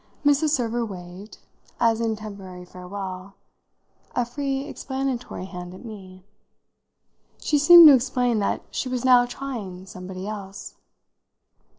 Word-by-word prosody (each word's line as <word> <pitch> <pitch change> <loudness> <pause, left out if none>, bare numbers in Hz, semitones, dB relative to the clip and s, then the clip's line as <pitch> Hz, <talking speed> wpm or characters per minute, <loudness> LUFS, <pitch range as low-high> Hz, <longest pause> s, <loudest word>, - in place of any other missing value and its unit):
Mrs. 290 +2 +4
Server 240 -4 0
waved, 185 0 -9 0.4
as 230 -1 +2
in 225 -1 0
temporary 195 -4 -9
farewell, 185 +1 -8 0.8
a 245 - +1
free 270 +2 -3
explanatory 265 -8 -4
hand 180 -1 -8
at 190 - -12
me; 190 -4 -11 1.2
she 295 - +1
seemed 340 +3 +10
to 295 - +10
explain 245 -2 +1
that 200 - -1
she 255 - -3
was 255 0 -3
now 250 -1 +6
trying 225 -9 -7
somebody 185 +1 -8
else. 200 -2 -7
220 Hz, 120 wpm, -24 LUFS, 190-255 Hz, 1.2 s, seemed